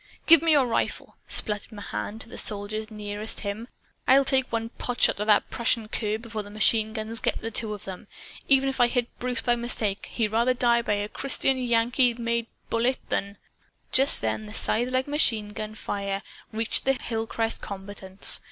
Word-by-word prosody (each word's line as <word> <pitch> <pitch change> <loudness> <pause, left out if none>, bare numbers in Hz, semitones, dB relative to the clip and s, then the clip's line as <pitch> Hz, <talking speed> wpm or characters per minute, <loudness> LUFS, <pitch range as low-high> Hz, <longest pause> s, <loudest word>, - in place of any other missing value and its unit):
"Give 330 -2 +8
me 325 -1 +3
your 280 -3 +4
rifle!" 230 -2 -2
sputtered 210 +1 +1
Mahan 205 - -6
to 225 - -4
the 235 - -6
soldier 210 +1 0
nearest 210 0 -5
him. 210 +3 -5 0.4
"I'll 270 +1 +5
take 265 -1 +1
one 230 0 -2
potshot 245 -4 +1
at 210 - -2
that 210 -1 +3
Prussian 230 -2 0
cur, 215 -1 -2
before 225 -1 -6
the 205 - -11
machine 215 +1 +2
guns 220 0 -3
get - - -1
the 225 - -6
two 220 0 -2
of 205 - -13
'em. 185 -1 -8 0.4
Even 270 0 +4
if 270 -1 -1
I 240 - +6
hit 240 0 -2
Bruce 250 -1 -2
by 240 - +2
mistake, 230 -4 +2
he'd 225 -3 0
rather 235 +3 +2
die 240 -1 +2
by 220 - -1
a 205 0 -2
Christian 270 +2 0
Yankee 240 0 +2
made 235 -1 -2 0.2
bullet 240 +3 +1
than 200 0 -2 0.3
" - - -40
Just 270 +2 +6
then 110 -1 -2
the 105 - -10
scythelike 255 +3 +1
machine 230 -8 +2
gun 215 +1 -7
fire 200 -2 -4 0.3
reached 225 +1 -1
the 270 - +3
hillcrest 225 -2 -3
combatants. 195 -1 +2
225 Hz, 185 wpm, -26 LUFS, 210-245 Hz, 0.4 s, Give